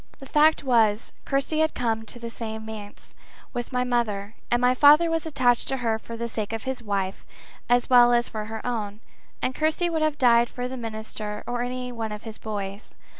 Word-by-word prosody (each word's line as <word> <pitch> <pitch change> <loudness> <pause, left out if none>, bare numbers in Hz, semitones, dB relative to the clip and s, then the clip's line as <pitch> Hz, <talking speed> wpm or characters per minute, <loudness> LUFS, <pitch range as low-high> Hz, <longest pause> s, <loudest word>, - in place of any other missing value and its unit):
The 270 - -11
fact 305 +3 +4
was, 225 -5 +2
Kirsty 275 +3 0
had 315 0 +2
come 225 -2 -1
to 240 - -5
the 235 -1 -7 0.3
manse 220 -2 -9 0.4
with 240 +2 -4
my 250 0 +1
mother, 220 -4 -1 0.2
and 240 - +2
my 250 +1 +4
father 300 +5 +6
was 325 0 -1
attached 250 -6 +2
to 270 - -1
her 225 -3 0
for 230 +1 -8
the 235 0 -3
sake 220 -2 -4
of 225 - -4
his 265 -1 -3
wife 200 -3 -2 0.5
as 245 0 +3
well 245 -1 +7
as 240 0 +3
for 215 -1 -5
her 220 0 -7
own, 215 -4 -3 0.4
and 255 - +1
Kirsty 315 +4 0
would 320 -1 0
have 310 -1 +1
died 235 -3 +5
for 250 0 -4
the 260 - -6
minister 220 -2 -5
or 240 0 -2
any 250 0 -3
one 225 -2 -4
of 210 0 -7
his 220 -2 -8
boys. 200 -1 -6
240 Hz, 205 wpm, -25 LUFS, 220-255 Hz, 0.5 s, well